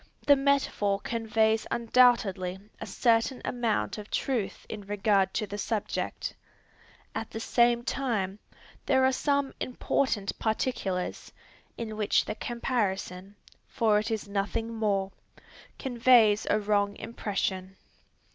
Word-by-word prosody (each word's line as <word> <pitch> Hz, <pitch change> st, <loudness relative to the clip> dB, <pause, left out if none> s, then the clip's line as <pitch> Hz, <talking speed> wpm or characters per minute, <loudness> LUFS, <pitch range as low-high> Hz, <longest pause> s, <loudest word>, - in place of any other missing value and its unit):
The 285 Hz, -, +7 dB
metaphor 270 Hz, -8 st, +1 dB
conveys 220 Hz, -1 st, +1 dB
undoubtedly 225 Hz, -6 st, +3 dB, 0.2 s
a -, -, -6 dB
certain 230 Hz, +5 st, +2 dB
amount 235 Hz, -3 st, -1 dB
of 210 Hz, -, -9 dB
truth 240 Hz, -7 st, -2 dB
in 215 Hz, -, -6 dB
regard 200 Hz, -1 st, +1 dB
to 215 Hz, -, 0 dB
the 205 Hz, 0 st, -6 dB
subject. 215 Hz, 0 st, -3 dB, 0.8 s
At 225 Hz, -, -4 dB
the 225 Hz, -, -6 dB
same 235 Hz, +1 st, +3 dB
time, 215 Hz, -7 st, -2 dB, 0.5 s
there 265 Hz, -1 st, +4 dB
are 260 Hz, -, +4 dB
some 280 Hz, 0 st, 0 dB
important 245 Hz, -4 st, -1 dB
particulars, 215 Hz, -5 st, -2 dB, 0.5 s
in 220 Hz, -2 st, -5 dB
which 210 Hz, -2 st, +2 dB
the -, -, -3 dB
comparison, 205 Hz, -5 st, -3 dB, 0.3 s
for 215 Hz, -2 st, +2 dB
it 215 Hz, -, -3 dB
is 220 Hz, -2 st, -3 dB
nothing 205 Hz, +3 st, -2 dB
more, 200 Hz, -3 st, 0 dB, 0.7 s
conveys 235 Hz, -4 st, +4 dB
a -, -, +3 dB
wrong 205 Hz, -1 st, +1 dB
impression. 190 Hz, -4 st, -3 dB
220 Hz, 120 wpm, -28 LUFS, 200-240 Hz, 0.8 s, The